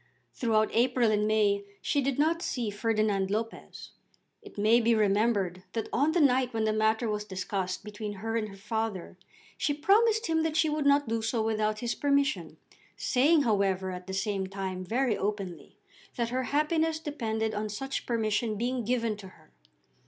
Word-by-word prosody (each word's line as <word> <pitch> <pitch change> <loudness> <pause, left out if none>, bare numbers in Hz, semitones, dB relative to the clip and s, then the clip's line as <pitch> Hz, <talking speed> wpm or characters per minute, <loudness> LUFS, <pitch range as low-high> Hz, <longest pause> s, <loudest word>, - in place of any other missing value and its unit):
Throughout 220 -3 +1
April 240 -1 +3
and 210 0 +1
May 205 -2 +2 0.2
she 285 - 0
did 270 -1 -1
not 325 +3 +2
see 240 - -2
Ferdinand 210 -2 0
Lopez. 225 +3 -5 0.5
It - - -14
may 220 +4 +4
be 230 0 +3
remembered 200 -3 +1
that 225 -2 -3
on 290 +5 +2
the 350 - +2
night 255 -4 +3
when 220 - +1
the 215 0 +1
matter 220 +2 +1
was 210 -1 -2
discussed 190 -1 -3
between 210 0 -6
her 225 +3 -4
and 215 -2 -1
her 195 - -11
father, 210 -3 -3 0.4
she 290 - +1
promised 440 +8 +3
him 320 -1 +1
that 320 -1 -1
she 315 - +3
would 300 -1 0
not 285 -1 +4
do 225 0 -1
so 225 0 0
without 215 -1 0
his 240 -1 -1
permission, 280 +1 0 0.4
saying, 290 +4 +3
however, 195 -4 +1
at 180 0 -8
the 190 - -5
same 195 -1 -1
time 190 -1 -4
very 235 +4 0
openly 195 -4 -4 0.4
that 235 -2 -1
her 255 +1 -1
happiness 315 +3 +1
depended 220 -8 -2
on 210 0 -3
such 270 +6 -4
permission 220 -1 0
being 245 +2 -1
given 230 -1 0
to 200 -2 -10
her. 160 -4 -19
220 Hz, 175 wpm, -29 LUFS, 205-260 Hz, 0.5 s, may